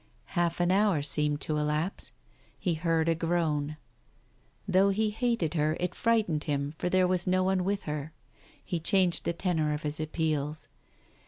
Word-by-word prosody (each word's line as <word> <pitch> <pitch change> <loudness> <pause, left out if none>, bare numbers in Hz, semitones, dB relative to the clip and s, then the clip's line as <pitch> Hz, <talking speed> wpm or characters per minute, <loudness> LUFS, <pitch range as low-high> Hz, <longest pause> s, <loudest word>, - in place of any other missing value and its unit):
Half 175 -2 0
an 175 +1 +2
hour 195 -6 +3
seemed 150 0 0
to 155 - -1
elapse. 150 +5 -1 0.5
He 175 - 0
heard 165 0 0
a 165 - +4
groan. 160 -3 -1 0.9
Though 190 +1 +4
he 210 +2 +1
hated 225 -7 0
her, 155 -1 +1
it 180 0 -1
frightened 215 -10 +1
him, 145 -1 -1
for 180 - -1
there 185 0 +3
was 180 0 0
no 185 0 +3
one 190 -1 +1
with 200 +2 -1
her. 150 0 -4 0.5
He 175 - -2
changed 180 0 +3
the 170 - 0
tenor 160 -4 0
of 150 - -7
his 150 +1 -2
appeals. 155 -1 -2
165 Hz, 165 wpm, -29 LUFS, 150-185 Hz, 0.9 s, a